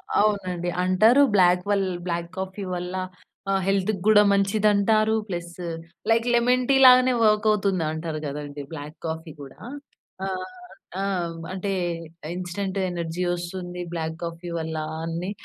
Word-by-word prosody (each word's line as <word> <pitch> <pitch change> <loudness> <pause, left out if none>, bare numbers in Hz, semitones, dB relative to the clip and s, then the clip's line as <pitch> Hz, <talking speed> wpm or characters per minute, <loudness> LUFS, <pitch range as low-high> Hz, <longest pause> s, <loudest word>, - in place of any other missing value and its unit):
అవును. - - +4
అవునండి. 185 -4 -1
అంటారు 215 +9 +5
బ్లాక్ 180 -1 +4
వల్ 195 -2 +2 0.2
బ్లాక్ 170 0 -2
కాఫీ 190 +1 -5
వల్ల 180 +1 -5 0.6
ఆహ్, 195 - +2
హెల్త్‌కి 195 0 +1
కూడా 210 -1 +7
మంచిది 200 +2 +2
అంటారు. 215 +2 +3
ప్లస్, 175 -2 -5 0.6
లైక్ 230 +1 +3
లెమన్ 250 +1 +3
టీ 275 - +5
లాగానే 255 0 +7
వర్క్ 215 0 +3
అవుతుంది 195 -5 +1
అంటారు 160 -1 -4
కదండీ! 145 0 -5
బ్లాక్ 150 +1 -8
కాఫీ 160 0 -4
కూడా. 135 -1 -12 0.7
ఆహ్, 185 -1 -3 0.6
ఆ! - - -1 0.5
అంటే 195 +1 -3 0.6
ఇన్‌స్టాంట్ 185 +2 -3
ఎనర్జీ 170 0 -3
వస్తుంది 175 0 -5
బ్లాక్ 160 -1 -3
కాఫీ 170 +1 -6
వల్ల 160 0 -4 0.3
అని 170 +3 -3
185 Hz, 135 wpm, -24 LUFS, 170-205 Hz, 0.7 s, కూడా